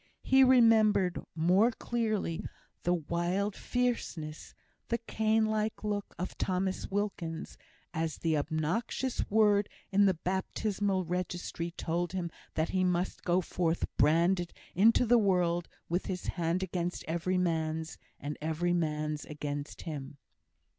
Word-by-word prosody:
He 265 0 +6
remembered 220 -7 +5
more 180 +8 +4
clearly 220 -8 -2 0.4
the 175 +1 +2
wild 175 +5 -1
fierceness, 225 -11 -2 0.3
the 235 - +1
Cain 220 -1 +1
like 215 0 -1
look, 205 -1 -3
of 180 +2 -4
Thomas 185 0 -1
Wilkins, 195 -5 -3 0.4
as 160 -1 -2
the 160 -2 +1
obnoxious 160 - -1
word 210 -1 +4 0.2
in 200 +1 +5
the 190 - +3
baptismal 190 +2 -1
registry 175 -1 -3
told 170 +1 -2
him 175 -3 -2 0.2
that 160 +1 +1
he 185 -1 +1
must 180 0 0
go 180 +1 +2
forth 170 -1 0
branded 170 +3 +3 0.2
into 225 +6 +5
the 240 +1 +5
world, 175 -4 +2 0.2
with 175 +2 -1
his 180 -2 -3
hand 175 +1 0
against 180 -1 -3
every 170 +3 0
man's, 160 -2 -1 0.2
and 145 +1 -5
every 160 +3 0
man's 155 -3 -1
against 145 -1 -5
him. 145 -4 -6
180 Hz, 125 wpm, -31 LUFS, 165-205 Hz, 0.4 s, He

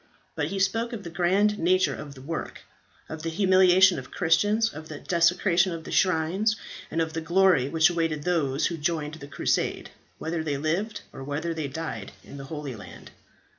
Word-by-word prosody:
But - - -2
he 195 - -4
spoke 225 +5 0
of 215 -4 -6
the 170 - -7
grand 195 +5 +2
nature 185 +2 +3
of 145 -2 -8
the 130 - -12
work, 165 +4 -5 0.5
of 160 0 -7
the 165 - -3
humiliation 185 +1 +5
to - - -15
Christians 205 +6 +2
of 155 +1 -9
the 155 - -6
desecration 175 +3 +2
of 165 -1 -6
the - - -8
shrines, 185 +5 +2 0.3
and 165 - -2
of 160 -1 -1
the 165 - -3
glory 170 -5 +3
which 160 +2 +4
awaited 165 -3 -1
those 155 -5 0
who 170 - -1
joined 150 -1 -2
the 150 -3 -9
crusade, 140 - -1 0.3
whether 160 +4 -3
they 145 -3 -2
lived 170 +9 -2
or 135 - -8
whether 150 +4 -3
they 155 -3 -3
died 135 -8 -6
in 140 - -11
the 140 - -8
Holy 145 -3 -6
Land. 100 - -12
165 Hz, 190 wpm, -26 LUFS, 155-185 Hz, 0.5 s, humiliation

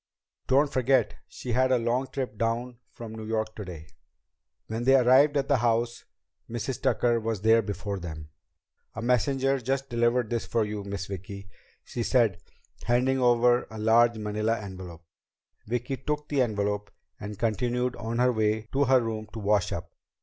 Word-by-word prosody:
"Don't 140 +2 +3
forget 130 -2 +2
she 125 - -7
had 130 +2 +2
a 130 - +5
long 120 +3 0
trip 130 -6 -4
down 115 +2 -2
from 115 -2 -9
New 110 -1 -7
York 110 -1 -2
today." 90 -7 -8 0.8
When 110 +2 -4
they 135 +2 +5
arrived 135 +3 +5
at 140 0 0
the 140 - +3
house, 120 0 0 0.4
Mrs. 120 +2 -4
Tucker 120 -1 +2
was 110 -3 -3
there 115 +1 +5
before 100 -1 -4
them. 80 -3 -8 0.6
"A 110 - -5
messenger 135 +3 +2
just 135 +2 -2
delivered 120 0 +1
this 115 -1 -2
for 115 -2 +1
you, 105 -1 -5
Miss 100 -2 -4
Vicki," 100 +1 -8 0.3
she 120 - -5
said, 115 -6 +2 0.4
handing 125 +2 +2
over 120 0 +3
a 110 - -9
large 115 +2 +4
manila 110 +1 -1
envelope. 95 -4 -9 0.6
Vicki 125 +4 -2
took 150 +3 -3
the 145 -3 +2
envelope 105 -3 -1 0.3
and 105 -1 -7
continued 125 +3 0
on 115 +2 -3
her 125 +1 +4
way 110 -1 +1
to 140 +1 +3
her 130 -1 +5
room 110 -2 -4
to 115 - -5
wash 105 -2 +1
up. - - -5
115 Hz, 165 wpm, -27 LUFS, 105-125 Hz, 0.8 s, a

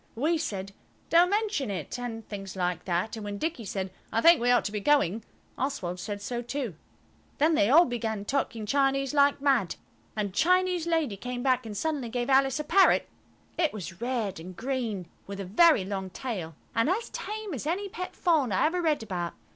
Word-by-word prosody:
We 310 +7 +1
said, 195 -9 -4 0.4
"Don't 345 +2 +6
mention 410 - 0
it," 190 +4 -4
and 225 -2 -5
things 195 -2 -7
like 180 -2 -2
that; 180 +5 -1
and 220 - -7
when 205 -1 -4
Dicky 315 -2 -3
said, 190 -1 -3 0.2
"I - - +1
think 335 +2 +6
we 245 - +2
ought 245 -1 +4
to - - -2
be 210 - -2
going," 225 - +2 0.4
Oswald 195 -10 -2
said 205 +2 -5
so 240 +2 -3
too. 245 -3 -4 0.6
Then 310 +3 +3
they 210 -8 +3
all 330 +6 +7
began 220 -4 -3
talking 235 -4 -1
Chinese 275 +3 +1
like 285 -1 +4
mad, 260 -12 +2 0.4
and 205 -3 -2
Chinese 360 - +2
lady 320 -11 0
came 245 +3 -5
back 255 -3 +2
and 210 -2 -6
suddenly 295 -5 -2
gave 245 +2 -2
Alice 270 +1 +4
a - - -1
parrot. 380 +6 +4 0.5
It 320 -3 +2
was 185 -3 -7
red 235 -7 -2
and 180 +3 -9
green, 230 -8 -3 0.2
with 200 0 -6
a 195 - -4
very 225 - +5
long 190 -1 -4
tail, 185 - -5 0.2
and 230 +6 +2
as 425 +6 -1
tame 425 -3 -5
as 280 +2 -4
any 380 +5 -1
pet 365 -1 -6
fawn 310 - +2
I 185 - +2
ever 350 +3 +1
read 310 -7 +1
about. 180 -5 -3
245 Hz, 195 wpm, -28 LUFS, 200-305 Hz, 0.6 s, all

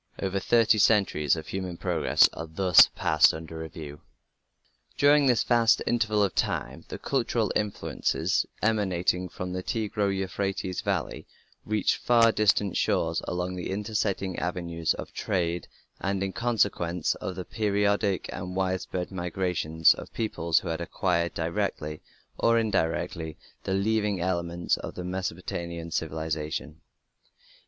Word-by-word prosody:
Over 95 0 -1
thirty 115 +1 +3
centuries 95 -9 +3
of 80 - -6
human 95 -2 -4
progress - - +3
are 80 - -6
thus 90 +2 +6
passed 80 0 +4
under 80 0 -8
review. 80 -2 -8 1.0
During 145 0 +5
this 125 -3 +3
vast 115 -2 +4
interval 110 -3 +2
of 100 - 0
time - - -2
the - - -6
cultural 120 -5 0
influences 105 -1 0 0.2
emanating 95 -4 +1
from 90 +2 -5
the 90 - -3
Tigro 105 -1 -1
Euphrates 95 -1 -2
valley - - -2 0.4
reached 105 -2 +1
far 115 -1 +4
distant 105 -2 +2
shores 80 0 +1
along 90 +1 -2
the 90 - -5
intersecting 100 -2 -2
avenues 85 -2 -1
of - - -8
trade, 85 -2 -1 0.3
and 95 0 -1
in 95 -1 -3
consequence 100 -8 0
of 95 - -4
the 90 -1 -6
periodic 100 -2 0
and 90 0 -6
widespread 95 -1 -2
migrations 85 -3 +2
of - - -10
peoples 85 -7 0
who 90 - -5
had 80 +1 -2
acquired 85 0 -1
directly 80 -3 -2 0.4
or 115 0 +4
indirectly 85 -6 -1 0.3
the 95 - 0
leavening 105 -1 +1
elements 85 -1 -1
of - - -8
Mesopotamian 85 -2 -4
civilization. 80 -1 -3
95 Hz, 130 wpm, -27 LUFS, 85-105 Hz, 1.0 s, thus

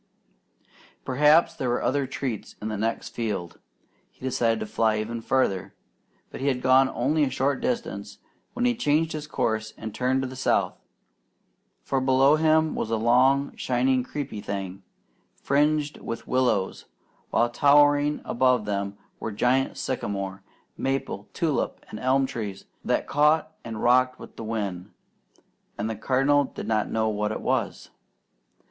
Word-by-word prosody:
Perhaps 150 +5 +4
there 130 -6 -3
were 120 - 0
other 140 0 +1
treats 130 -5 -5
in 110 - -4
the 110 - -3
next 115 +3 -2
field. 105 -7 -4 0.5
He - - -34
decided 120 -3 0
to - - -2
fly 110 0 +1
even 115 +2 -3
farther. 110 -7 0 0.6
But - - -8
he 140 - -1
had 125 -2 0
gone 130 +1 +5
only 150 +6 +1
a 140 - +2
short 135 +1 0
distance 230 - -3 0.4
when 245 0 -1
he 245 - +3
changed 160 -8 +1
his 150 -1 -5
course 110 -5 -2
and 110 -1 -6
turned 130 +1 0
to - - -2
the 130 - -8
South, 130 - +1 1.1
for 135 - 0
below 135 +2 +5
him 160 0 +3
was - - -3
a 115 - +1
long, 130 +5 +3
shining, 130 +1 +1
creeping 130 -5 -5
thing, 95 -1 -5 0.5
fringed 150 +1 +1
with 115 - -6
willows, 120 -7 0 0.4
while 120 0 +2
towering 145 +2 +4
above 125 -2 +2
them 100 -1 -3 0.2
were 110 - -4
giant 125 +5 +1
sycamore, 100 -6 -3 0.4
maple, 135 -6 -2
tulip, 155 -7 -2
and 105 - -6
elm 135 +1 +2
trees 105 -6 -5 0.2
that - - 0
caught 150 +2 +2
and 115 -2 -6
rocked 130 +1 +4
with - - -12
the - - -7
wind; 100 -5 -3 0.9
and 105 - -2
the 110 - -3
Cardinal 135 +6 +2
did - - -8
not 110 -1 0
know 110 0 0
what 105 0 -1
it - - -4
was. - - -2
130 Hz, 155 wpm, -26 LUFS, 110-140 Hz, 1.1 s, gone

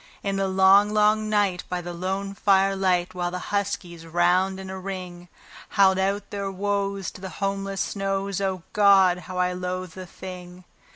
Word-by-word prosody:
In 195 -1 -1
the 195 0 0
long, 190 +2 +5
long 215 0 +2
night, 200 -4 +1
by 180 - -2
the 175 0 -6
lone 190 +3 -3
firelight, 190 -3 +2
while 175 -1 -2
the 180 - -4 0.2
huskies, 180 -4 -2
round 180 +3 +2
in 190 - -7
a 190 - -6
ring, 180 -2 -7 0.5
Howled 190 -1 +5
out 195 +2 -1
their 200 -1 -3
woes 200 0 -2
to - - -13
the 190 - -6
homeless 195 0 -3
snows 195 -1 -2
O 190 -3 -2
God! 195 -3 +5
how 185 - -5
I 180 0 +1
loathed 180 -1 -4
the 185 0 -9
thing. 180 0 -10
190 Hz, 170 wpm, -25 LUFS, 180-195 Hz, 0.5 s, long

